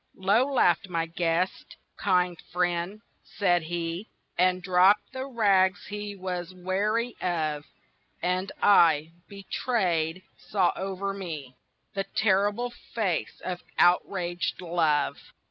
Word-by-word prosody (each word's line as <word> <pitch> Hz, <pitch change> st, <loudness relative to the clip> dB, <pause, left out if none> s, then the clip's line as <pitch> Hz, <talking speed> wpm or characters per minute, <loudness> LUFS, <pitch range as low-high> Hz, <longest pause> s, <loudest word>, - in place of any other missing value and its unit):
Low 215 Hz, +9 st, +2 dB
laughed 190 Hz, -7 st, +3 dB
my 165 Hz, -2 st, 0 dB
guest: 170 Hz, +2 st, -2 dB, 0.2 s
"Kind 180 Hz, -3 st, +1 dB
friend!" 180 Hz, +3 st, -1 dB, 0.2 s
said 175 Hz, -4 st, +1 dB
he, 170 Hz, +4 st, -4 dB, 0.3 s
And 185 Hz, 0 st, +2 dB
dropped 190 Hz, +5 st, +4 dB
the 260 Hz, +1 st, -4 dB
rags 200 Hz, -6 st, +2 dB
he 205 Hz, 0 st, -6 dB
was 185 Hz, -1 st, -5 dB
weary 210 Hz, +6 st, -1 dB
of; 155 Hz, -4 st, -1 dB, 0.5 s
And 185 Hz, +2 st, -1 dB
I, 165 Hz, -6 st, +5 dB, 0.2 s
betrayed, 185 Hz, -4 st, -1 dB, 0.2 s
saw 190 Hz, -4 st, +1 dB
over 195 Hz, +1 st, -3 dB
me 155 Hz, -10 st, -6 dB, 0.4 s
The 195 Hz, 0 st, -2 dB
terrible 205 Hz, +4 st, +2 dB, 0.2 s
face 200 Hz, -7 st, -1 dB
of 180 Hz, -1 st, -3 dB, 0.2 s
outraged 175 Hz, 0 st, +2 dB
Love. 165 Hz, -5 st, +1 dB
185 Hz, 110 wpm, -27 LUFS, 175-200 Hz, 0.5 s, I